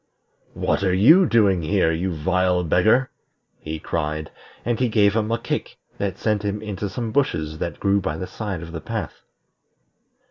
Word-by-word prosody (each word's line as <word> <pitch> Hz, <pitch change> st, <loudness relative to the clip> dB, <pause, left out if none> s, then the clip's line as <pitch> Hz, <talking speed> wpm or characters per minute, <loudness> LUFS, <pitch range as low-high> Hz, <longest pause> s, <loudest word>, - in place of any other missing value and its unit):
"What -, -, 0 dB
are 95 Hz, -2 st, +2 dB
you 160 Hz, -, +6 dB
doing 100 Hz, -7 st, +3 dB
here, 80 Hz, 0 st, +2 dB
you 90 Hz, +3 st, -1 dB
vile 90 Hz, +2 st, +1 dB
beggar?" 110 Hz, +10 st, +3 dB, 0.5 s
he 80 Hz, 0 st, -5 dB
cried; 75 Hz, -1 st, -3 dB, 0.3 s
and 120 Hz, -1 st, 0 dB
he 125 Hz, -2 st, +2 dB
gave 105 Hz, -2 st, +3 dB
him 110 Hz, 0 st, 0 dB
a 115 Hz, -, +2 dB
kick 115 Hz, -, -4 dB, 0.2 s
that 100 Hz, -2 st, -2 dB
sent 105 Hz, -2 st, 0 dB
him 100 Hz, 0 st, -2 dB
into 105 Hz, -1 st, -4 dB
some 115 Hz, +2 st, -4 dB
bushes 80 Hz, -, -1 dB
that 85 Hz, -3 st, -4 dB
grew 100 Hz, 0 st, +2 dB
by 80 Hz, -3 st, -3 dB
the 95 Hz, -, -4 dB
side 95 Hz, -5 st, -5 dB
of 85 Hz, -, -9 dB
the 80 Hz, -1 st, -6 dB
path. -, -, -5 dB
95 Hz, 175 wpm, -22 LUFS, 85-110 Hz, 0.5 s, you